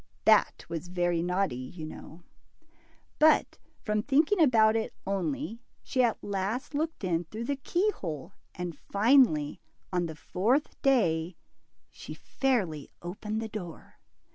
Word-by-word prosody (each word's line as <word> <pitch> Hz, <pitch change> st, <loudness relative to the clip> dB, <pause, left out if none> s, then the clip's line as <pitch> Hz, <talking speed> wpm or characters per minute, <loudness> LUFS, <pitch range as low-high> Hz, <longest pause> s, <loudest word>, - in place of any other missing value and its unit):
That -, -, +4 dB
was 170 Hz, +1 st, -5 dB
very 175 Hz, -1 st, 0 dB
naughty, 180 Hz, -2 st, 0 dB
you 130 Hz, +6 st, -7 dB
know. 160 Hz, +2 st, -10 dB, 1.0 s
But, 310 Hz, 0 st, +4 dB, 0.2 s
from 210 Hz, -1 st, 0 dB
thinking 305 Hz, -, +3 dB
about 225 Hz, -6 st, +5 dB
it 225 Hz, -1 st, -2 dB
only, 230 Hz, +5 st, -2 dB, 0.2 s
she 260 Hz, -, 0 dB
at 235 Hz, -3 st, +1 dB
last 205 Hz, +8 st, -3 dB
looked 310 Hz, -3 st, -2 dB
in 175 Hz, -2 st, 0 dB
through 215 Hz, +8 st, -6 dB
the 280 Hz, +4 st, -1 dB
keyhole, 200 Hz, -, -2 dB, 0.2 s
and 175 Hz, -2 st, -4 dB
finally, 200 Hz, -, +3 dB, 0.3 s
on 175 Hz, -1 st, +1 dB
the 160 Hz, -, -7 dB
fourth 225 Hz, -, 0 dB
day, 175 Hz, -11 st, +2 dB, 0.5 s
she -, -, -9 dB
fairly 195 Hz, -, -1 dB
opened 210 Hz, +5 st, -4 dB
the -, -, -3 dB
door. 185 Hz, -6 st, -9 dB
200 Hz, 130 wpm, -29 LUFS, 175-255 Hz, 1.0 s, about